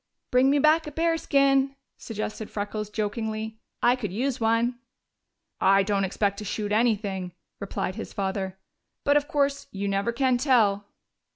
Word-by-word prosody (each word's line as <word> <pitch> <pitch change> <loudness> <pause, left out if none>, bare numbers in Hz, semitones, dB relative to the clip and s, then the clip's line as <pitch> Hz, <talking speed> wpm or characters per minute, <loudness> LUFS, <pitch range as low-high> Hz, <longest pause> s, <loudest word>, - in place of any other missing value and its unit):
"Bring 255 +2 +5
me 285 - +4
back 310 +2 +4
a - - -5
bearskin," 275 -4 +2 0.2
suggested 215 -1 -5
Freckles 210 0 -4
jokingly. 220 +1 -3 0.2
"I 245 +1 +5
could 215 -7 -4
use 250 +6 -1
one." 230 +2 +1 0.8
"I 195 +1 +5
don't 200 -1 +1
expect 200 +1 -1
to - - -6
shoot 205 0 -3
anything," 205 -5 0 0.3
replied 195 -1 -3
his - - -7
father. 190 -1 -3 0.5
"But, 285 - +3
of 290 0 +2
course, 285 -3 0
you 200 0 -3
never 200 +3 0
can 250 +1 +1
tell." 215 -7 +3
220 Hz, 150 wpm, -26 LUFS, 200-270 Hz, 0.8 s, Bring